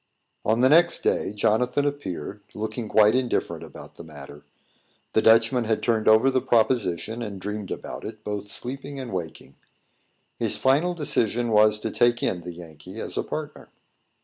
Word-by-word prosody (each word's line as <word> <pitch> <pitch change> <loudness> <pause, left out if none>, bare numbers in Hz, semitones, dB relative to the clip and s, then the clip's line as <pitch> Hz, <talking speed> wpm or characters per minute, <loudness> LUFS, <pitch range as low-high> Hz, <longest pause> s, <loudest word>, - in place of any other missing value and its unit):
On 110 +2 +1
the 130 - +5
next 170 +3 +4
day, - - 0
Jonathan 120 +7 +1
appeared, 105 - -4
looking 110 +1 -4
quite 105 0 +5
indifferent 125 -1 -1
about - - -12
the - - -9
matter. 75 -2 -12 0.7
The 110 - +3
Dutchman 115 +2 +4
had 110 0 -1
turned 110 -2 +1
over 110 +5 +6
the 130 -1 +1
proposition, 115 -3 +1
and 105 -4 -5
dreamed 105 0 -5
about - - -6
it, 110 -1 -8
both 105 -1 -5
sleeping 135 +6 -6
and 125 -5 -6
waking. 80 -6 -6 0.8
His - - -1
final 150 +7 +2
decision 120 -6 0
was 105 0 +5
to 110 - -3
take 120 -1 +2
in 90 - -1
the 90 +1 -7
Yankee 80 -3 -11
as - - -6
a - - 0
partner. - - -7
110 Hz, 165 wpm, -25 LUFS, 105-125 Hz, 0.8 s, over